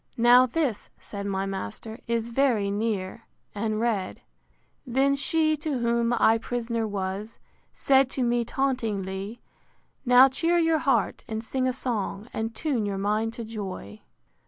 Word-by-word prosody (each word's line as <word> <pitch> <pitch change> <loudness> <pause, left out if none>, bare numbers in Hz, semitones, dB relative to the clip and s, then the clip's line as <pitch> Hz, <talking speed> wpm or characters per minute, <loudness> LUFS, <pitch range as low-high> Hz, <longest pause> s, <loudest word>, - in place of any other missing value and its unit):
Now 245 +2 +6
this, 255 -5 -2
said 200 -1 -6
my 195 -1 -1
master, 195 - -6
is 230 0 -1
very 235 -5 +1
near; 205 0 -3 0.3
and 215 +1 -2
read: 220 -5 -1
III. - - -30 0.7
Then 275 +2 +3
she, 310 +2 +1
to 295 -2 -2
whom 235 0 +1
I 225 -1 +4
prisoner 230 -1 -2
was, 200 +2 -4 0.4
Said 270 -1 +4
to 260 - +1
me 240 0 +1
tauntingly, 220 -5 -2 0.6
Now 250 +1 +7
cheer 330 +6 +1
your 325 -2 +3
heart, - - +1
and 220 -1 -4
sing 255 +2 -1
a - - +2
song, 220 -4 -3
And 225 0 -3
tune 265 -3 -1
your 200 -1 -2
mind 215 +3 0
to 235 - -6
joy. 190 - -7
230 Hz, 150 wpm, -26 LUFS, 205-255 Hz, 0.7 s, Now